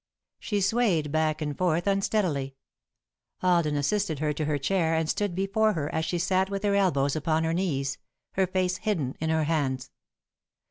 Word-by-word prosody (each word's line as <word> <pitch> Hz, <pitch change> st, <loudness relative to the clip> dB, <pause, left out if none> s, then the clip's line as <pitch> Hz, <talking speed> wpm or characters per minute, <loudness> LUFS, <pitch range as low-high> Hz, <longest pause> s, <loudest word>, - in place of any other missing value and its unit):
She 205 Hz, -2 st, -1 dB
swayed 190 Hz, -8 st, +1 dB
back 155 Hz, 0 st, 0 dB
and 150 Hz, -1 st, -3 dB
forth 175 Hz, 0 st, +1 dB
unsteadily. 190 Hz, -9 st, 0 dB, 0.9 s
Alden 170 Hz, -5 st, +3 dB
assisted 160 Hz, +3 st, 0 dB
her 150 Hz, +1 st, 0 dB
to 150 Hz, +1 st, -2 dB
her 150 Hz, -1 st, 0 dB
chair 165 Hz, +3 st, +1 dB
and 160 Hz, -1 st, 0 dB
stood 200 Hz, +2 st, -1 dB
before 200 Hz, +3 st, +2 dB
her 150 Hz, -3 st, -3 dB
as 160 Hz, 0 st, 0 dB
she 175 Hz, +2 st, -1 dB
sat 190 Hz, +2 st, +1 dB
with 200 Hz, +1 st, -3 dB
her 205 Hz, -1 st, +2 dB
elbows 145 Hz, -9 st, +2 dB
upon 160 Hz, +1 st, 0 dB
her 160 Hz, 0 st, 0 dB
knees, 140 Hz, -7 st, -1 dB, 0.3 s
her 190 Hz, -1 st, +1 dB
face 185 Hz, 0 st, 0 dB
hidden 160 Hz, -13 st, -1 dB
in 160 Hz, -, -1 dB
her 160 Hz, 0 st, +2 dB
hands. 140 Hz, -5 st, -1 dB
165 Hz, 175 wpm, -27 LUFS, 150-190 Hz, 0.9 s, Alden